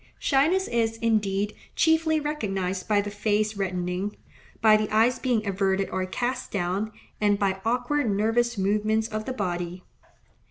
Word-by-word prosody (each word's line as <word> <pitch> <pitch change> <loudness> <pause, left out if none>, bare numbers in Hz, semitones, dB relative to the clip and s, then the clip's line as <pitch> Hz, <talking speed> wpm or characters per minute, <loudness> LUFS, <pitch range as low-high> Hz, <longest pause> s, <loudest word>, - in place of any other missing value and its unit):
Shyness 320 +8 +2
is, 225 -1 0
indeed, 210 -3 0 0.2
chiefly 320 -1 +3
recognized 195 -11 -2
by 210 -2 +3
the 205 0 -5
face 210 +1 0
reddening, 185 +1 -2 0.4
by 215 -1 +6
the 215 0 0
eyes 230 +4 +3
being 240 -5 0
averted 195 0 0
or 185 0 -1
cast 245 +7 -2
down, 195 +3 -1 0.3
and 205 -1 +3
by 195 -1 0
awkward, 245 +3 0
nervous 225 +3 +1
movements 215 +3 +1
of 215 0 -4
the 260 - -3
body. 180 -4 -3
215 Hz, 145 wpm, -26 LUFS, 195-235 Hz, 0.4 s, by